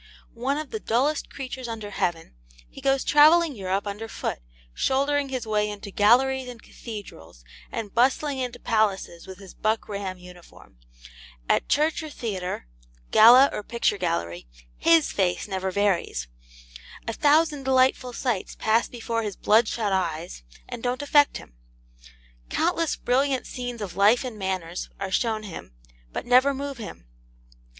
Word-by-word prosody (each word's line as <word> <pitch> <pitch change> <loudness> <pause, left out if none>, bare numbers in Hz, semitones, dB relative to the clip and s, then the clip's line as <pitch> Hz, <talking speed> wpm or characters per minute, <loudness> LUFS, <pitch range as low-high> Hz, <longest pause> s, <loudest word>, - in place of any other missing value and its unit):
One 260 +4 -1
of 305 -1 -6
the 440 - -3
dullest 280 - 0
creatures 260 -2 -6
under 220 -3 -6
heaven, 170 -4 -2 0.3
he - - -13
goes 270 0 +2
travelling 310 +1 +5
Europe 195 0 -2
under 210 +2 -5
foot, - - -4 0.3
shouldering 280 - +1
his 255 -3 -3
way 210 -1 0
into 205 -1 -8
galleries 255 +6 +3
and 245 -2 -9
cathedrals, 135 - -10 0.3
and 220 -4 -5
bustling 265 +3 +2
into 250 -2 -3
palaces 200 -6 -1
with 190 -1 -9
his 195 -1 -13
buck 215 +1 -1
ram 200 -2 -5
uniform. 180 - -16 0.7
At - - +1
church 310 +3 +2
or 310 - -7
theatre, 190 - -4 0.5
gala 250 +5 +8
or - - -3
picture 215 -2 -1
gallery, 85 - -2 0.3
HIS 330 -2 +4
face 185 -1 0
never 190 -1 -2
varies. 185 - 0 0.8
A 230 - -2
thousand 300 +2 +3
delightful 260 -1 +2
sights 240 -5 -3
pass 225 +2 +2
before 230 -1 -3
his 210 -3 -4
bloodshot 215 -1 +2
eyes, 170 - -2 0.3
and 245 -2 -7
don't 250 +3 -2
affect 290 0 +4
him. - - -14 1.0
Countless 335 -2 0
brilliant 265 +1 0
scenes 245 -3 -5
of 180 -4 -7
life 210 +6 +4
and 240 -5 -6
manners 185 -3 -3
are 195 -1 -4
shown 220 +2 0
him, 165 - -9 0.4
but - - -5
never 255 +3 +4
move 280 -1 -5
him. 210 - -9
230 Hz, 145 wpm, -25 LUFS, 195-265 Hz, 1.0 s, gala